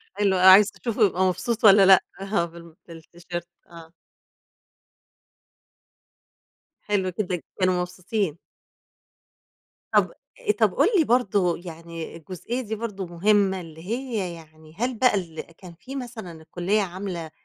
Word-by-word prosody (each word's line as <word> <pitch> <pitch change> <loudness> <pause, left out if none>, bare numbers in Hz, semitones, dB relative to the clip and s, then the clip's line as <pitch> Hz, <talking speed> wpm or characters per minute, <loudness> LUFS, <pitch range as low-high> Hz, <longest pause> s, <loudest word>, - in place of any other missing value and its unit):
حلو، 200 -2 +2
آه، 180 - +3
عايز 200 +2 +8
تشوفه 230 -2 0
هيبقى 190 -1 0
مبسوط 220 +5 -1
والَّا 200 -2 +8
لأ، 190 -1 +7 0.2
آه 195 -3 0
بال 170 -1 -13
بالتيشيرت 175 +1 -8 0.2
آه. 165 -1 -13 2.9
حلو 200 -3 0
جدًا، 180 -4 -2 0.2
كانوا 185 -1 +2
مبسوطين. 180 -1 -3 1.6
طَب - - +3 0.5
طَب - - +3
قُل - - +3
لي 330 - +5
برضه 205 - +1
يعني 165 -1 -8
الجزئية 185 +9 -5
دي 220 -2 -4
برضه 210 -4 -5
مهمة، 190 +2 +1
اللي 160 -1 -12
هي 225 -6 -3
يعني 155 -1 -16
هل 245 +1 -2
بقى 250 -1 +4
ال 170 -5 -4
كان 170 +1 -14
في 255 +11 -10
مثلًا 235 -8 -7
الكُلّية 180 +6 -1
عاملة 180 -3 -5
185 Hz, 125 wpm, -24 LUFS, 170-210 Hz, 2.9 s, عايز